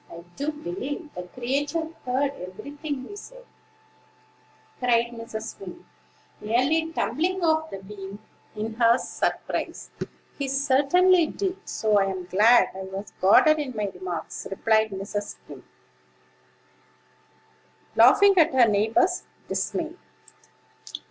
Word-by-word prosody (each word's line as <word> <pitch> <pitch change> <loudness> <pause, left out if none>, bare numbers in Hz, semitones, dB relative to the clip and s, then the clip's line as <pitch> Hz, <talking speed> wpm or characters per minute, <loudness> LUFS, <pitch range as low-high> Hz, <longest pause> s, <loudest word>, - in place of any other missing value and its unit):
I 170 0 -10
do 290 +2 -2
believe 290 - -6
the 180 0 -7
creature 290 +6 -1 0.2
heard 270 +3 +1 0.2
every 215 +9 -10
thing 290 -3 -5
we 410 - -9
said," - - -12 1.3
cried 235 -1 +2
Mrs. 230 -1 -7
Wing, 190 -2 -10 0.5
nearly 275 +9 +1
tumbling 355 +3 -1
off 315 -1 +2
the 195 0 -8
beam, 195 0 -9 0.4
in 220 +1 -4
her 235 0 +5
surprise. - - -3 0.5
"He 280 - -1
certainly 290 +6 +4
did; 385 +1 -4
so 215 -2 +2
I'm 190 -2 -1
glad 215 +7 +5
I 190 - -7
was 195 +2 -7
guarded 310 +11 +6
in 265 -5 -4
my 205 -2 -1
remarks," 180 -2 -6
replied 220 +2 +2
Mrs. 200 +1 -5
Skim, - - -13 2.3
laughing 405 -1 +7
at 320 -4 +4
her 245 -3 +6
neighbor's 225 - +2 0.2
dismay. 330 -1 -2
250 Hz, 115 wpm, -25 LUFS, 205-310 Hz, 2.3 s, laughing